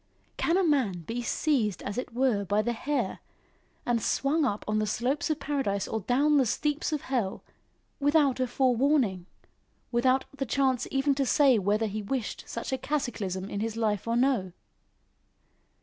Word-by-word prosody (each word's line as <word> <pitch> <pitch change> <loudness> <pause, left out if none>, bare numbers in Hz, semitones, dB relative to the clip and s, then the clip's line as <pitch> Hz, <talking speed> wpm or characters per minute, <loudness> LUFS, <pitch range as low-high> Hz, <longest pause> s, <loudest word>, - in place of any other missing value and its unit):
Can 335 +2 +1
a 385 - +3
man 260 - +1
be 230 +8 -4
seized 240 - 0
as 200 - -4
it 250 - -4
were 240 -4 +1
by 205 +3 +1
the 240 - 0
hair, 285 +5 -2 0.7
and 235 -2 +1
swung 290 +6 +1
up 210 -5 -2
on 215 0 +1
the 215 - 0
slopes 260 +10 -1
of 310 -1 0
paradise 265 -10 -1
or 220 - -2
down 285 +8 +3
the 265 - +4
steeps 295 +8 -1
of 300 -3 -1
hell 235 -8 -2 0.6
without 290 -2 +3
a 255 - +1
forewarning, 250 - +1 0.6
without 255 +2 +2
the 270 0 -2
chance 265 -1 +1
even 275 +1 +2
to 275 0 0
say 270 -5 +5
whether 205 +3 +1
he 215 0 -3
wished 230 +2 -4
such 230 +3 -4
a 260 - -1
cataclysm 210 -10 -2
in 200 - -4
his 225 +1 -3
life 215 -2 0
or 230 - +1
no? 240 -8 +1
245 Hz, 170 wpm, -28 LUFS, 215-280 Hz, 0.7 s, say